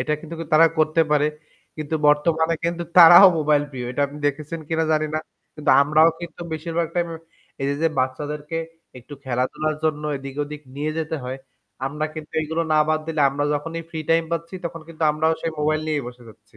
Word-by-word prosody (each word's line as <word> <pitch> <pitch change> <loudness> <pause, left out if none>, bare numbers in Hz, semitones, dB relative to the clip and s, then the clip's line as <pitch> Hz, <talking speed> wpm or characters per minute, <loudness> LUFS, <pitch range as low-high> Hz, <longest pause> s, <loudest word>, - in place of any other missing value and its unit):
এটা 150 - -1
কিন্তু 165 0 -9 0.2
তারা 165 +2 +7
করতে 155 +1 +2
পারে। 150 0 +3 0.5
কিন্তু 155 0 -4
বর্তমানে 160 +2 +2
কিন্তু 170 0 -1 0.2
তারাও 175 +3 +10
মোবাইল 150 -1 +2
প্রিয়, 125 -2 -6
এটা 145 +3 -1
আপনি 145 +1 -11
দেখেছেন 150 +3 -3
কিনা 160 0 0
জানি 155 0 +1
না। - - +1 0.4
কিন্তু 150 - 0
আমরাও 155 +3 +5
কিন্তু 170 0 -9
বেশিরভাগ 165 +1 -2
টাইমে 170 -2 -1 0.5
এই 135 - -1
যে, 140 - 0
যে 165 - +4
বাচ্চাদেরকে 145 +4 -3 0.4
একটু 135 +4 -11
খেলাধুলার 130 +5 -1
জন্য 150 -1 0
এদিক-ওদিক 145 +2 -6 0.2
নিয়ে 150 +2 -2
যেতে 160 0 -2
হয়, 130 +1 -5 0.5
আমরা 150 +3 -3
কিন্তু 155 -1 -9
এইগুলো 160 +2 -2
না 155 - +4
বাদ 155 0 +1
দিলে 160 -2 -2
আমরা 145 +1 -2
যখনই 165 +3 -4
ফ্রি 160 - -5
টাইম 165 0 +4
পাচ্ছি 170 +2 -4
তখন 165 -1 -5
কিন্তু 165 -1 -8
আমরাও 160 +1 +1
সেই 165 - -2
মোবাইল 155 +1 +1
নিয়েই 150 -3 -1
বসে 125 0 -13
যাচ্ছি। 110 - -19
155 Hz, 190 wpm, -22 LUFS, 145-165 Hz, 0.5 s, তারাও